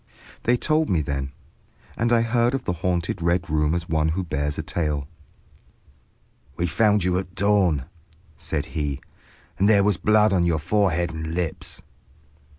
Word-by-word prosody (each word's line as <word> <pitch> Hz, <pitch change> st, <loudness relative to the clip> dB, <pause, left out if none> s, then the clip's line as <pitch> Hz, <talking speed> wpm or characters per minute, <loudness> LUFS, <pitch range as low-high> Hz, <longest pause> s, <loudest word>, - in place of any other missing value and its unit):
They 120 Hz, +1 st, +3 dB
told 155 Hz, +4 st, +1 dB
me 85 Hz, -5 st, +2 dB
then, 70 Hz, -1 st, -3 dB, 0.6 s
and 120 Hz, +1 st, 0 dB
I 115 Hz, -1 st, +5 dB
heard 120 Hz, +2 st, +2 dB
of 135 Hz, -, -3 dB
the 90 Hz, -, -1 dB
haunted 85 Hz, 0 st, -2 dB
Red 85 Hz, +1 st, 0 dB
Room 75 Hz, +1 st, +2 dB
as 85 Hz, 0 st, -3 dB
one 80 Hz, -1 st, +1 dB
who 90 Hz, +3 st, -2 dB
hears 75 Hz, +1 st, -1 dB
a -, -, -3 dB
tale. 75 Hz, -4 st, -2 dB, 1.5 s
"We 85 Hz, -, -1 dB
found 105 Hz, +3 st, +2 dB
you 90 Hz, 0 st, +1 dB
at 95 Hz, 0 st, -8 dB
dawn," 95 Hz, -9 st, +2 dB, 0.5 s
said 75 Hz, +1 st, -3 dB
he, 75 Hz, -4 st, -2 dB, 0.6 s
"and 100 Hz, +2 st, +4 dB
there 100 Hz, -2 st, +5 dB
was 100 Hz, -3 st, +2 dB
blood 105 Hz, +1 st, +4 dB
on 90 Hz, -2 st, +3 dB
your 85 Hz, -2 st, +2 dB
forehead 85 Hz, 0 st, +1 dB
and 80 Hz, +1 st, -5 dB
lips." 85 Hz, -3 st, -3 dB
85 Hz, 160 wpm, -24 LUFS, 80-105 Hz, 1.5 s, I